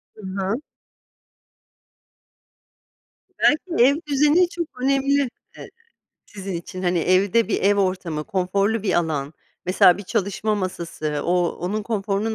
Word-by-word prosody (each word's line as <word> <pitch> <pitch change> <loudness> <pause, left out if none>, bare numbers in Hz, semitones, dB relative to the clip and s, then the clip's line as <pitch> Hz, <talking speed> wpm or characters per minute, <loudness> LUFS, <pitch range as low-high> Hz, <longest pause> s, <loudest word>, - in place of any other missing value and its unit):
I - - -18
hı. 195 +4 -3 2.8
Belki, 310 -2 +3
ev 280 +2 +4
düzeni 300 +5 +3
çok 335 -7 -6
önemli, 275 0 +2 0.3
e, - - -9 0.6
sizin 195 -1 -7
için, 185 +2 -6
hani, 175 -1 +1
evde 185 +5 +2
bir - - -1
ev 205 +1 +4
ortamı 185 -6 -1
konforlu 200 +3 0
bir 205 - 0
alan 155 -4 -1 0.3
mesela 180 0 +5
bir - - -6
çalışma 210 +1 -1
masası 165 -6 -3
o 175 0 +2
onun 205 +5 -2
konforunun 210 0 -2
200 Hz, 120 wpm, -22 LUFS, 180-230 Hz, 2.8 s, mesela